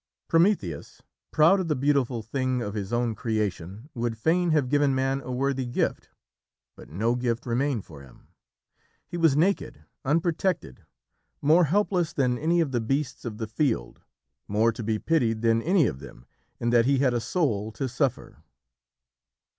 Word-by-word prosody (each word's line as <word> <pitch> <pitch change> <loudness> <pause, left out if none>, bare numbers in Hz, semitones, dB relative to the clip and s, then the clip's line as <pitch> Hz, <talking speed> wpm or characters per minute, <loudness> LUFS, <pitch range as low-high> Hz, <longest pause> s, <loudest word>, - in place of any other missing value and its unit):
Prometheus, 165 - 0 0.3
proud 165 +6 +4
of 185 - -2
the 150 - +1
beautiful 130 -4 0
thing 130 +2 -1
of 105 -4 -4
his 100 -2 -4
own 120 -1 0
creation, 105 - -3
would 120 -2 -3
fain 170 +8 +1
have 150 -5 +2
given 145 0 +2
Man 135 +1 0
a 130 - -7
worthy 130 0 -1
gift, 120 - -2 0.7
but - - -14
no 110 +10 0
gift 120 -1 -2
remained 125 -1 -1
for 75 -4 -12
him. 65 -2 -18 0.8
He - - -8
was 165 -5 +3
naked, 190 +5 0 0.2
unprotected, 165 - -1 0.5
more 160 +4 +4
helpless 180 0 +1
than 125 -3 0
any 170 +2 +2
of 150 -5 -1
the 120 -3 0
beasts 135 +3 -2
of 110 -3 -5
the 110 - -3
field, 110 - -2 0.5
more 110 +3 +2
to 115 - -7
be 110 0 -1
pitied 115 -5 0
than 115 0 +3
any 175 +2 +3
of 65 - -2
them 65 -3 -13 0.3
in 120 - 0
that 120 0 +4
he 140 0 +3
had 130 -2 +2
a 120 - 0
soul 115 - -1
to 135 - -3
suffer. 130 +1 -2
125 Hz, 165 wpm, -26 LUFS, 115-150 Hz, 0.8 s, proud